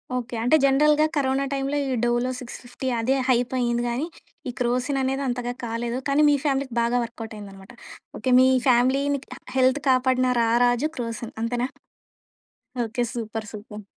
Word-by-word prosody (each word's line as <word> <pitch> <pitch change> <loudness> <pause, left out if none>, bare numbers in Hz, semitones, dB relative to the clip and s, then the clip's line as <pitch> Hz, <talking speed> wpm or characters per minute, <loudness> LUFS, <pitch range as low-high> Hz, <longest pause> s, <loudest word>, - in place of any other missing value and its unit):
Okay. 245 -1 -4
అంటే 245 +6 +4
జనరల్‌గా 300 +3 +4
corona 275 -1 +1
టైమ్‌‌లో 275 +1 -1
ఈ 265 - -1
డోలో 240 +1 +1
సిక్స్‌ఫిఫ్టీ 250 +1 -8
అదే 255 +4 +1
హైపయింది 240 -1 +1
గానీ 250 +6 -1 0.4
ఈ - - -2
క్రోసిన్ 250 +3 0
అనేది 270 +1 -1
అంతగా 245 -1 -2
కాలేదు. 235 +1 -3
కానీ 280 +2 +3
మీ 290 - +4
ఫ్యామిలీకి 275 -3 0
బాగా 235 +1 +1
వర్కవుటయిందన్నమాట. 215 -3 -9 0.5
ఓకే 255 - -1
మీ 260 - +6 0.2
ఫ్యామిలీ‌ని 265 +3 +3
క - - -11 0.2
హెల్త్ 260 +2 +3
కాపాడిన 255 0 +3
రారాజు 245 +4 +2
క్రోసిన్ 230 -2 -5
అంతేనా? 240 +2 -1 1.2
Okay 235 +2 -2
super. 225 -2 -5
సూపర్. 210 0 -9
245 Hz, 140 wpm, -24 LUFS, 235-265 Hz, 1.2 s, మీ